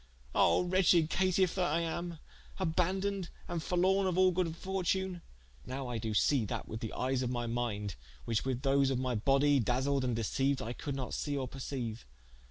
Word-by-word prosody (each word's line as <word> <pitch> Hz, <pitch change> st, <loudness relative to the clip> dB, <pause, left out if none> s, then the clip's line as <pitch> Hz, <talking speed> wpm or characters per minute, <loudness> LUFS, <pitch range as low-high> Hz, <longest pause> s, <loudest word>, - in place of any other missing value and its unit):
Ah 85 Hz, -, +4 dB
wretched 175 Hz, -3 st, +4 dB
caitife 185 Hz, -1 st, +2 dB
that 180 Hz, -5 st, 0 dB
I 165 Hz, +2 st, +2 dB
am, 170 Hz, +1 st, -3 dB, 0.4 s
abandoned 190 Hz, +2 st, 0 dB, 0.2 s
and 170 Hz, -1 st, -3 dB
forlorne 190 Hz, +3 st, +2 dB
of 180 Hz, -1 st, 0 dB
all 185 Hz, 0 st, +5 dB
good 170 Hz, -2 st, -1 dB
fortune: 190 Hz, -1 st, -1 dB, 0.4 s
nowe 130 Hz, 0 st, -5 dB
I 120 Hz, -2 st, -2 dB
doe 110 Hz, 0 st, -3 dB
see 130 Hz, +4 st, +3 dB
that -, -, -4 dB
with 110 Hz, -, -5 dB
the 110 Hz, -3 st, -4 dB
eies 130 Hz, 0 st, 0 dB
of 125 Hz, -, -1 dB
my 120 Hz, -1 st, -2 dB
minde, 115 Hz, -4 st, -2 dB, 0.3 s
which 115 Hz, -2 st, 0 dB
with 130 Hz, 0 st, -2 dB
those 135 Hz, 0 st, +3 dB
of 135 Hz, -, 0 dB
my 130 Hz, 0 st, -1 dB
body 135 Hz, +5 st, +3 dB
daseled 130 Hz, +3 st, +1 dB
and 125 Hz, -3 st, 0 dB
deceiued 135 Hz, +5 st, +1 dB
I 115 Hz, +2 st, -4 dB
could 140 Hz, +2 st, -5 dB
not 130 Hz, -2 st, -4 dB
see 145 Hz, -1 st, -2 dB
or 130 Hz, -2 st, -2 dB
perceiue. 125 Hz, -4 st, -4 dB
140 Hz, 185 wpm, -32 LUFS, 125-180 Hz, 0.4 s, all